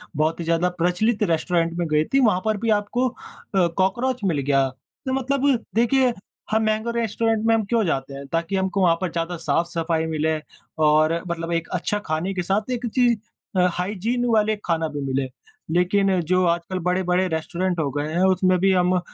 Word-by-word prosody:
बहुत 155 +3 0
ही - - -2
ज़्यादा 170 +2 +2
प्रचलित 205 +6 +1
रेस्टोरेंट 165 0 +1
में 170 -2 -1
गई 155 0 +2
थी 275 - +5
वहाँ 185 -4 +2
पर 215 -1 +1
भी 230 +3 -2
आपको 245 +5 -1
अ, - - -17 0.6
कॉकरोच 235 +7 0
मिल 165 -7 +1
गया। 135 -1 +2
तो 260 - -8
मतलब 270 -1 +1
देखिए, 245 +2 +3 0.4
हम 220 +1 +2
महँगे 215 +2 0
रेस्टोरेंट 225 0 0
में 225 - +4
हम 220 - +1
क्यों 230 +1 +1
जाते 135 -4 -2
हैं 140 +1 -7
ताकि 165 +4 -1
हमको 190 +1 0
वहाँ 170 -2 +4
पर 185 -3 -1
ज़्यादा 170 +1 -3
साफ-सफाई 165 -1 -1
मिले 160 0 0 0.5
और 155 +1 +4
मतलब 170 0 -3
एक 165 0 -1
अच्छा 195 +4 -1
खाने 160 +5 -1
के 180 - -2
साथ 205 +5 -1
एक 245 0 -2
चीज़ 240 -3 +4 0.4
अ, 180 - +5
हाइजीन 210 +7 -1
वाले 215 0 +3
खाना 165 -2 0
भी 145 -1 -5
मिले। 135 0 -1 0.5
लेकिन 190 +1 +2
जो 185 +3 +1
आजकल 170 +2 -1
बड़े-बड़े 180 +1 +1
रेस्टोरेंट 175 +2 -2
हो 145 -3 0
गए 145 +1 -2
हैं 175 +2 +2
उसमें 185 0 +2
भी 195 +1 +3
हम 180 0 +3
180 Hz, 190 wpm, -23 LUFS, 165-215 Hz, 0.6 s, थी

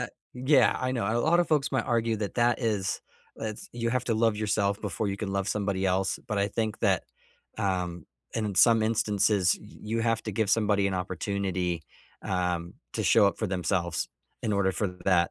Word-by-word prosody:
i - - 0
uh - - -4 0.3
yeah, 130 +4 +4
I 130 0 0
know, 120 -6 -1
a 115 - +1
lot 170 +7 +4
of 175 - 0
folks 150 -2 +1
might 130 - +1
argue 115 -1 +1
that 105 -2 -4
that 120 +1 +2
is 105 -5 -1 0.4
that's 110 -1 -6
you 115 -1 -1
have 125 0 0
to 115 - 0
love 110 -1 +2
yourself 100 -1 0
before 105 +1 -2
you 100 - -2
can 100 -1 -4
love 100 0 -1
somebody 100 -2 -1
else, 95 +1 +1
but 105 - -1
I 100 +1 +2
think 110 -1 -2
that, 95 -5 +2 0.5
um, 90 -5 -2 0.3
in 105 -3 -1
some 115 +2 +6
instances, 105 -4 +2
y - - -13 0.2
you 115 +2 -1
have 115 -1 +1
to 110 - -2
give 105 0 0
somebody 105 -3 +3
an 100 - -1
opportunity, 90 -2 -2 0.4
um, 90 -2 -1 0.2
to - - -2
show 100 - +5
up 100 - 0
for 110 - -1
themselves 90 -2 -1 0.3
in 110 - 0
order 100 -1 +2
for 100 +1 -1 0.2
that 90 -3 +3
105 Hz, 205 wpm, -28 LUFS, 95-115 Hz, 0.5 s, some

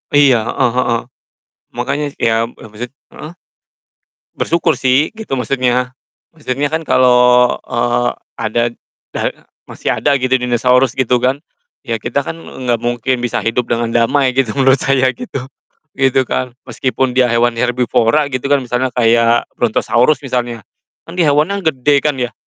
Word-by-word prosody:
Iya, 140 -4 +6
heeh 125 -3 +1
heeh. 120 -2 +1 0.8
Makanya, 150 +1 -1 0.2
iya, 115 - +3 0.2
lebih 105 -2 -15
sit - - -34 0.2
heeh? 155 - -9 1.0
Bersyukur 170 0 +1
sih, 135 - +1
gitu 220 -12 -5
maksudnya. 125 -1 0 0.4
Maksudnya 145 -2 -2
kan 160 - 0
kalo, 130 0 +3 0.6
eee, 120 +1 0 0.3
ada, 115 +2 0 0.5
da - - -3 0.5
masih - - -2
ada 140 -1 +1
gitu 130 0 -1
dinosaurus, 125 +1 +2
gitu 125 -1 +1
kan. 130 +3 +1 0.5
Ya 115 -2 -1
kita 135 +3 -2
kan, - - -4
nggak 120 -3 -3
mungkin 120 +1 -1
bisa 120 - -1
hidup 115 +2 -1
dengan 115 0 0
damai 130 +2 +2
gitu, 130 -5 +1
menurut 135 0 +4
saya 130 -1 +2
gitu, 140 - -6 0.5
gitu 135 -1 +2
kan. 130 -1 -2 0.2
Meskipun 130 +1 -1
dia 125 -2 +3
hewan 120 0 +2
herbivora 125 +3 +1
gitu 130 +1 -3
kan, 140 - +4
misalnya 125 +2 -1
kayak 115 0 +3
Brontosaurus 125 +4 +2
misalnya, 120 -4 -3 0.4
kan 165 - -9
dia 165 -5 +3
hewannya 175 +8 +1
gede 145 -2 +2
kan 145 -3 0
ya, 125 0 -2
125 Hz, 145 wpm, -16 LUFS, 120-135 Hz, 1.0 s, Iya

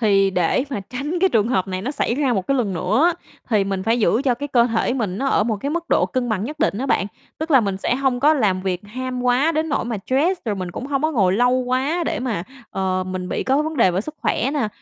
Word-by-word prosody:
thì 195 -3 +3
để 180 +7 +1
mà 260 - -2
tránh 290 +7 -3
cái 380 - +5
trường 225 - +2
hợp 190 -6 0
này 185 0 -3
nó 250 - -2
xảy 280 -5 -1
ra 270 -2 +1
một 190 -5 -1
cái 275 - +1
lần 225 -7 0
nữa 265 - +1
á, 350 - +3 0.4
thì 210 -3 +3
mình 195 -1 -2
phải 225 +4 +1
giữ 225 +3 +2
cho 260 -4 +2
cái 285 +4 -5
cơ 240 -3 +4
thể 230 +1 0
mình 210 -7 -2
nó 275 - -1
ở 240 - +2
một 220 -1 0
cái 275 +8 -4
mức 340 +2 -2
độ - - +3
cân 255 -2 -2
bằng 210 -3 -1
nhất 300 +6 -6
định 300 -10 +1
á 265 - -2
bạn. 195 -7 +1 0.3
Tức 315 +1 -4
là 270 -4 +6
mình 200 -3 -1
sẽ 195 - 0
hông 260 -1 0
có 300 +3 +5
làm 205 -9 +1
việc 185 -2 -1
ham 255 +3 -4
quá 250 +6 +3
đến 315 0 -1
nỗi 290 - 0
mà 230 -1 -3
stress, 330 +8 +1
rồi 215 -3 -1
mình 185 -2 -5
cũng 250 - -6
hông 275 -1 -1
có 315 - +2
ngồi 195 -9 +3
lâu 245 +5 +3
quá 255 +6 0
để - - -2
mà, 230 -9 -2 0.3
ờ, 185 -1 -1
mình 185 -1 -4
bị - - -2
có 270 +3 +2
vấn 315 0 -4
đề 230 -7 +4
về 180 +2 0
sức 305 +9 -7
khỏe 260 - +1
nè, 260 -8 0
245 Hz, 290 wpm, -21 LUFS, 200-275 Hz, 0.4 s, là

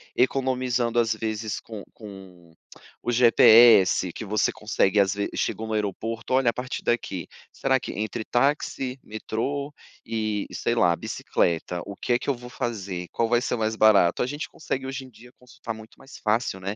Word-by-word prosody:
economizando 125 -2 0
às 115 -1 +3
vezes, 110 -1 -3
com 110 -3 -9
com 95 -5 -13 0.5
o 120 - -1
GPS 115 -6 +6
que - - -7
você 105 +1 +1
consegue 105 -2 0
Às 100 0 +3
vezes, 100 0 -3
chegou 110 0 -2
no 110 - -3
aeroporto: 110 +3 -3
"Olha, 130 -2 +4
a - - -24
partir 125 +1 -5
daqui, 110 -6 -1 0.2
será 130 -1 +1
que - - -5
entre 110 +1 -3
táxi, 135 0 0
metrô 140 +7 -4 0.3
e 110 -2 -2
sei 120 - -1
lá 85 -7 +3
bicicleta, 85 +1 -1
o 100 0 -8
que 120 - -1
é 120 - +2
que 140 - -4
eu 135 - +2
vou 125 0 -11
fazer? 95 -8 -4
Qual 115 - 0
vai 120 +1 +2
ser 125 - -1
mais 110 0 -1
barato?" 110 -5 +4
A - - -2
gente 145 +3 -4
consegue 135 -3 -4
hoje 135 0 -5
em - - -14
dia 120 +1 -17
consultar 125 -2 -8
muito 110 0 -13
mais 135 - -13
fácil, 110 -3 0
né. 100 +2 -4
115 Hz, 185 wpm, -25 LUFS, 105-125 Hz, 0.5 s, GPS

